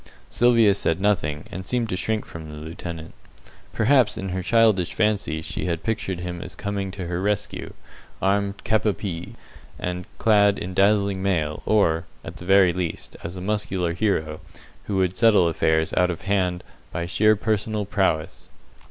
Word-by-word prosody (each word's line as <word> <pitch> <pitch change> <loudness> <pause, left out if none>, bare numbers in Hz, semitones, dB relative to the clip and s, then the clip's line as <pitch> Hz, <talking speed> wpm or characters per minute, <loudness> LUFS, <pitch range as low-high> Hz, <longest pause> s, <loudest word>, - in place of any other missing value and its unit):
Sylvia 115 -4 +5
said 80 -4 0
nothing, 80 -7 0
and 95 +1 -7
seemed 120 -2 0
to 90 - -1
shrink 110 +3 -1
from 80 -1 -9
the 75 - -8
lieutenant. 80 +1 -7 0.6
Perhaps 125 +1 +3
in 95 - -4
her 95 +1 -2
childish 110 -3 +3
fancy 100 -8 0
she - - -4
had 85 -2 -2
pictured 100 -5 -2
him 90 -1 -5
as - - -7
coming 100 -1 -3
to 95 -1 -6
her 90 +1 -3
rescue, 105 0 -2 0.5
armed 100 +1 0
cap 110 -1 +1
a 105 - +3
pie, 85 -2 -6 0.4
and 90 0 -4
clad 105 -2 +4
in 90 - -5
dazzling 100 0 +2
mail, 80 -6 0
or, 85 -6 +3 0.2
at - - -8
the 85 - -10
very 95 -2 +5
least, 90 -2 -4
as 85 +2 -6
a 90 - -6
muscular 95 -4 -1
hero, 85 -6 -1 0.5
who 100 - -2
would 95 -1 +1
settle 105 -6 +5
affairs 80 -1 +1
out 90 0 +3
of 85 - -4
hand 90 -2 0 0.3
by 85 - -3
sheer 110 +4 +3
personal 105 0 -1
prowess. 95 -5 -1
95 Hz, 170 wpm, -24 LUFS, 85-105 Hz, 0.6 s, Sylvia